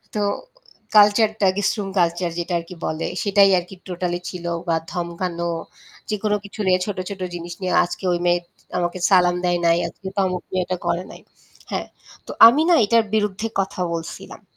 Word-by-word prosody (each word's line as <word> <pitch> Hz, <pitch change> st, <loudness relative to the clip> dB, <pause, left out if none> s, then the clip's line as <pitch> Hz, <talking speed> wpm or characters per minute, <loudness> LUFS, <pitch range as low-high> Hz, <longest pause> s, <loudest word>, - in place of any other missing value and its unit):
তো 210 Hz, -, 0 dB, 0.7 s
কালচারটা 210 Hz, 0 st, +5 dB
guest 205 Hz, -, +1 dB
room 200 Hz, -2 st, -3 dB
culture 170 Hz, 0 st, +1 dB
যেটা 175 Hz, +1 st, -3 dB
আরকি 170 Hz, +2 st, -10 dB
বলে 155 Hz, +1 st, -2 dB, 0.2 s
সেটাই 200 Hz, -1 st, +5 dB
আরকি 180 Hz, +2 st, -10 dB
টোটালি 175 Hz, 0 st, -2 dB
ছিল 175 Hz, -2 st, -8 dB, 0.2 s
বা 165 Hz, -, +2 dB, 0.2 s
ধমকানো 170 Hz, 0 st, -3 dB, 0.6 s
যেকোনো 210 Hz, 0 st, 0 dB
কিছু 205 Hz, -, -12 dB
নিয়ে 185 Hz, 0 st, +4 dB
ছোট, 205 Hz, -2 st, -4 dB
ছোট 200 Hz, -1 st, -7 dB
জিনিস 170 Hz, 0 st, -6 dB
নিয়ে 185 Hz, -1 st, -1 dB
আজকে 175 Hz, -, -7 dB
ওই 175 Hz, -, 0 dB
মেয়ে 175 Hz, 0 st, +3 dB, 0.4 s
আমাকে 175 Hz, +1 st, -1 dB
সালাম 180 Hz, -2 st, +5 dB
দেয় 175 Hz, 0 st, +1 dB
নাই। 170 Hz, 0 st, +4 dB
আজকে 190 Hz, +3 st, -10 dB
তো -, -, 0 dB
আমাকে 180 Hz, 0 st, -5 dB
এটা 180 Hz, +1 st, -3 dB
করে 170 Hz, +1 st, 0 dB
নাই। -, -, -12 dB, 0.5 s
হ্যাঁ, -, -, -2 dB, 0.4 s
তো -, -, -5 dB, 0.2 s
আমি 260 Hz, +7 st, +4 dB
না 350 Hz, -, +6 dB
এটার 230 Hz, +2 st, +4 dB
বিরুদ্ধে 210 Hz, 0 st, 0 dB
কথা 190 Hz, -1 st, -4 dB
বলছিলাম। 165 Hz, 0 st, -7 dB
180 Hz, 175 wpm, -22 LUFS, 175-200 Hz, 0.7 s, না